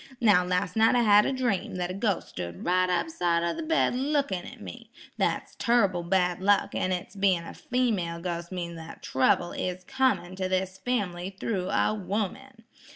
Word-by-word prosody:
Now 205 -6 +5
las' 180 +1 -1
night 225 +2 +4
I 240 - +4
had 210 -1 +6
a - - 0
dream 245 -10 -1
that 180 0 -2
a - - -4
ghos' 200 -1 -1
stood 85 -1 -7
right 185 +1 +2
up 180 - +1
side 170 - +1
'o 170 0 0
the - - -5
bed 320 -4 +1
lookin' 270 -8 -1
at 245 - -11
me. 230 +1 -10 0.3
That's - - -1
turrible 200 -7 +2
bad 180 0 +1
luck; 200 +1 +3
an' 185 - -1
its 180 +2 -4
bein' 190 -4 +2
a - - -8
female 215 -10 -1
ghos' 170 0 -4
means 170 -2 -5
that 165 0 -10
trouble 155 +6 +2
is 185 0 -4
comin' 260 -7 0
to 185 -1 -2
this 185 0 -1
family 190 -6 -2
thro' 190 -5 -2
a - - +2
'ooman. 220 +5 -4
190 Hz, 190 wpm, -27 LUFS, 180-230 Hz, 0.3 s, had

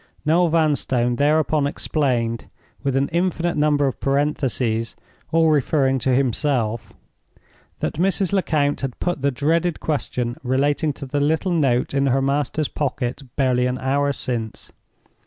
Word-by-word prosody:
Noel 170 +3 +3
Vanstone 140 -7 +1
thereupon 150 0 +2
explained—with 130 -1 -2
an 135 +1 +2
infinite 175 0 0
number 150 -1 +2
of 135 - -2
parentheses 135 -5 -1 0.4
all 160 -1 +4
referring 135 -2 +2
to 130 0 +1
himself—that 125 -3 0 1.0
Mrs. 190 +3 0
Lecount 150 -7 +1
had 135 -3 -4
put 175 -5 -2
the 140 - +2
dreaded 160 +5 0
question 125 -5 -2
relating 145 +4 +1
to 140 - -8
the 145 +2 -2
little 160 +6 +1
note 135 -8 +1
in 140 0 +2
her 135 +1 +2
master's 140 +2 0
pocket 130 -2 -3
barely 125 -2 +2
an 125 0 -2
hour 140 +2 0
since. 115 -5 -4
140 Hz, 130 wpm, -22 LUFS, 130-155 Hz, 1.0 s, all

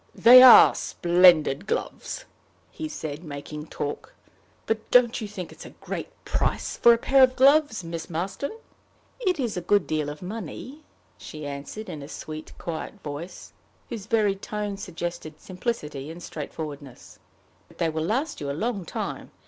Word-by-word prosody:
"They're 255 +1 +9
splendid 175 -2 +3
gloves," - - -4 0.5
he 315 -1 -6
said, 155 - -6
making 150 0 -8
talk; 150 - -6 0.5
"but 220 0 -2
don't 245 -1 +4
you 215 - -4
think 190 -4 -7
it - - -12
a - - -10
great - - -5 0.2
price - - -1
for 235 - +6
a 235 - +5
pair 270 +3 +3
of 255 0 +5
gloves, 275 - +4
Miss 165 -1 -6
Marston?" 185 - -3 0.7
"It 370 -9 0
is 235 -7 -2
a - - -2
good 205 +4 +2
deal 155 -2 -2
of 150 +4 -8
money," 225 - -7 0.4
she 155 -1 -8
answered, 145 +10 -7
in 150 - -7
a 140 - -8
sweet, 155 0 -8
quiet 170 +4 -6
voice, 155 +5 -8 0.4
whose 220 -4 -7
very 215 -3 +2
tone 205 +1 -4
suggested 175 -4 -6
simplicity 170 - -5
and 170 +2 -9
straightforwardness; 145 -3 -8 0.5
"but - - -21
they 165 - +1
will 160 0 -3
last 255 - -2
you 140 - -3
a - - -1
long 215 -2 -2
time. - - -5
180 Hz, 155 wpm, -25 LUFS, 155-230 Hz, 0.7 s, They're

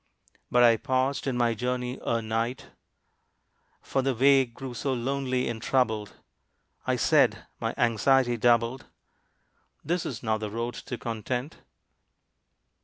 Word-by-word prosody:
But 125 0 +4
I 115 -1 +6
paused 130 +2 -1
in 130 -2 -1
my 120 -1 +2
journey 125 +2 -3
ere 115 -1 0
night, 115 +3 -3 1.1
For 135 - 0
the 135 -1 0
way 135 +2 +5
grew 125 +2 -8
so 130 +4 -2
lonely 130 0 -1
and 115 -2 -4
troubled; 110 -5 0 0.7
I - - +2
said - - +3
my - - -2
anxiety 120 +2 +3
doubled 120 +2 +2 1.0
"This 175 +3 0
is 120 -2 -6
not 110 -1 0
the 105 -1 -4
road 115 +3 -3
to 125 -3 -6
Content." 120 +6 -4
125 Hz, 130 wpm, -27 LUFS, 115-130 Hz, 1.1 s, I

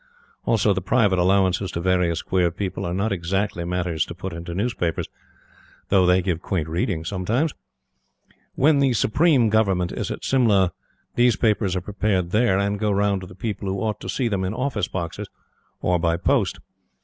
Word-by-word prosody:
Also, 105 -2 +3
the 95 - -2
private 100 -1 +2
allowances 95 +1 +2
to - - -4
various 90 -2 +1
queer 90 -2 +1
people 95 +2 -4
are 85 - -2
not 100 +4 0
exactly 95 0 -1
matters 85 -3 -1
to 85 - -8
put 95 0 -6
into 85 +1 -6
newspapers, 95 -5 -1 0.8
though 95 -2 +4
they 90 0 +4
give 85 -3 -1
quaint 85 -5 -2
reading 85 0 -2
sometimes. 110 - -1 1.0
When 145 +1 +4
the 135 -2 +3
Supreme 130 +1 +3
Government 100 -5 +1
is - - -4
at - - -5
Simla, 105 -9 +3 0.4
these 120 -2 +3
papers 105 -4 +1
are 90 - -1
prepared 95 -2 -1
there, 105 -2 +3
and 100 +1 0
go 105 0 0
round 100 -1 +1
to 95 - -8
the 90 - -13
people 105 0 -4
who 95 - -2
ought 110 -1 -2
to 95 - -7
see 120 +6 0
them 100 -4 -1
in 95 +4 -2
office 120 -7 -1
boxes 85 -3 -5 0.6
or 90 -1 +2
by 85 0 +1
post. - - +1
95 Hz, 180 wpm, -23 LUFS, 90-110 Hz, 1.0 s, though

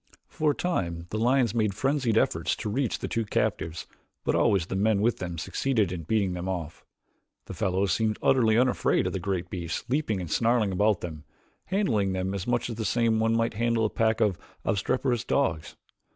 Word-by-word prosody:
For 155 - 0
a 145 - +1
time 85 - -2
the 110 - -2
lions 125 0 +2
made 110 -4 0
frenzied 135 -4 +1
efforts - - +1
to 105 - -4
reach 130 +1 0
the - - -4
two 115 - -1
captives 85 -5 -2 0.4
but - - +1
always 95 -5 +3
the 95 - -5
men 105 +1 +2
with 110 +2 +2
them 85 -2 -4
succeeded 110 +3 0
in 85 -3 -5
beating 100 -1 +1
them 90 +1 -4
off. 85 -4 -5 0.6
The - - -7
fellows 95 0 0
seemed 110 +2 +1
utterly 115 -4 +3
unafraid 125 +1 +2
of - - -2
the 95 - -2
great 90 -1 -3
beasts 85 -2 -4
leaping 125 -7 0
and 85 -3 -6
snarling 115 -3 +2
about 105 +1 +2
them, 80 -4 -6 0.4
handling 115 - +1
them 95 +1 -2
much 120 -1 0
the 115 -1 -4
same 115 0 +2
as - - +1
one 115 0 +2
might 115 0 0
handle 115 0 +1
a 105 - -1
pack 110 0 +1
of 100 -5 +2 0.3
obstreperous 120 +4 0
dogs. 85 - -1
110 Hz, 195 wpm, -27 LUFS, 95-120 Hz, 0.6 s, always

